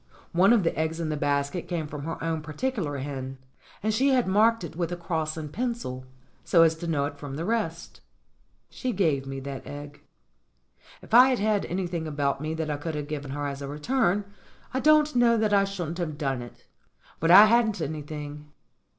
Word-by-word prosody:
One 185 +5 +5
of 230 -5 +4
the 165 - 0
eggs 160 +1 -1
in 165 -2 -2
the 155 - -1
basket 145 +3 -1
came 170 -3 -2
from 150 -1 -7
her 165 - -4
own 165 -1 -1
particular 155 - -3
hen, 135 -1 -5 0.5
and 215 0 +1
she 260 +6 +2
had 255 -3 +3
marked 215 +2 +3
it 165 -1 -7
with 170 0 -2
a - - -1
cross 165 -2 -3
in 155 -2 -5
pencil, 225 - -4 0.4
so 165 -2 +5
as 165 -1 +4
to 170 +1 -6
know 145 -4 +1
it 145 0 -6
from 140 -2 -6
the 165 +3 -3
rest. 195 -7 -3 0.7
She 255 -2 -4
gave 150 -9 +1
me 135 0 -5
that 135 0 -7
egg. 145 0 -9 1.0
If - - -13
I 250 +3 +9
had 255 - +2
had 210 -1 +1
anything 175 -3 -3
about 145 -2 -1
me 155 +1 -3
that 160 -1 -2
I 145 - -2
could 155 +2 -4
have 145 -1 -4
given 145 -2 -5
her 145 +1 -3
as 140 0 -4
a 140 - -5
return, 190 - 0 0.5
I 260 - 0
don't 305 0 +4
know 235 -1 +4
that 215 -1 +1
I 200 -1 +5
shouldn't 175 -4 -5
have 155 -4 -3
done 135 -4 -1
it. 120 - -12 0.5
But 165 - +1
I 200 +4 +10
hadn't 220 -2 +3
any 155 -1 -3
thing. 150 0 -8
160 Hz, 210 wpm, -26 LUFS, 145-205 Hz, 1.0 s, I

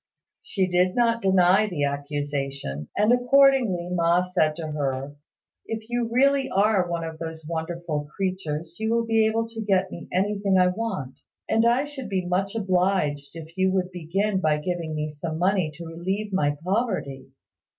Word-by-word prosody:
She 190 -2 -1
did 180 +1 +2
not 235 -1 +2
deny 190 +1 +4
the 170 -8 -2
accusation; 140 - -3
and 210 +4 +4
accordingly 245 -7 +4
Ma 170 0 +3
said 155 -4 +1
to 160 -1 -5
her, 140 -1 -3 0.5
"If 225 +1 -6
you 240 -1 0
really 275 +2 +3
are 200 -2 +2
one 170 -1 -2
of 160 -1 -6
those 160 -1 -6
wonderful 165 -2 -3
creatures 170 -4 -3
you 220 0 -1
will 230 0 +1
be 225 -1 +3
able 225 +1 0
to 225 -1 -6
get 190 -3 +1
me 170 - -8
anything 200 +1 +1
I 180 0 +5
want; 185 - -4 0.3
and 225 +1 +3
I 245 +4 +3
should 290 -6 -7
be 190 -2 -1
much 195 +3 -1
obliged 180 -8 0
if 165 0 -10
you 190 0 +2
would 185 -1 0
begin 190 +4 -1
by 155 -2 +2
giving 165 0 -3
me 150 0 -2
some 155 +2 -5
money 185 -1 +2
to 170 +2 -8
relieve 190 +5 -3
my 145 -5 +1
poverty." 180 - -2
180 Hz, 170 wpm, -25 LUFS, 160-215 Hz, 0.5 s, I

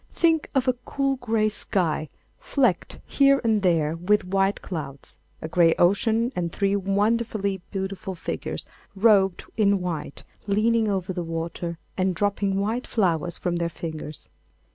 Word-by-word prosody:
Think 325 -2 +2
of 265 -1 +2
a 255 - +4
cool 275 -1 -1
grey 225 -3 +1
sky 170 -7 -1 0.3
flecked 250 -11 0
here 275 0 +4
and 220 -2 +2
there 165 -4 +2
with 195 +5 +1
white 195 +1 +1
clouds, 140 -6 -7 0.2
a - - -2
grey 165 0 +4
ocean 225 +7 +2
and 170 -2 -2
three 200 +2 +1
wonderfully 200 0 0
beautiful 190 -1 -4
figures 170 - -4 0.3
robed 195 -3 +3
in 200 -2 +3
white, 165 -6 -5 0.2
leaning 220 +2 +2
over 190 -2 -1
the 180 - -3
water 165 +1 -4 0.2
and 185 -1 +1
dropping 200 0 0
white 225 +5 -1
flowers 175 -6 0
from 175 -1 -1
their 170 0 -1
fingers. 155 -2 -7
195 Hz, 140 wpm, -25 LUFS, 170-220 Hz, 0.3 s, a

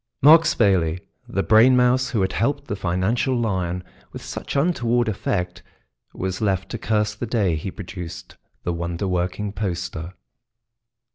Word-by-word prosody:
Mark 160 +3 +8
Spayley, 90 -6 +2 0.3
the 95 - -1
brain 115 +4 +6
mouse 125 +1 +3
who 115 -4 0
had 95 - 0
helped 140 +4 0
the 105 - -3
financial 95 +8 0
lion 90 -5 -1 0.3
with - - -9
such - - -6
untoward 120 -6 +1
effect, 90 -3 -2 0.5
was 95 +1 -4
left 95 -2 0
to 115 - -5
curse 105 -1 0
the 115 +3 -5
day 105 -7 +1
he 80 +5 -4
produced 90 -3 -8 0.3
the 85 - -1
wonder 85 +3 -3
working 90 +3 -1
poster. 90 -3 -4
100 Hz, 145 wpm, -23 LUFS, 90-120 Hz, 0.5 s, Mark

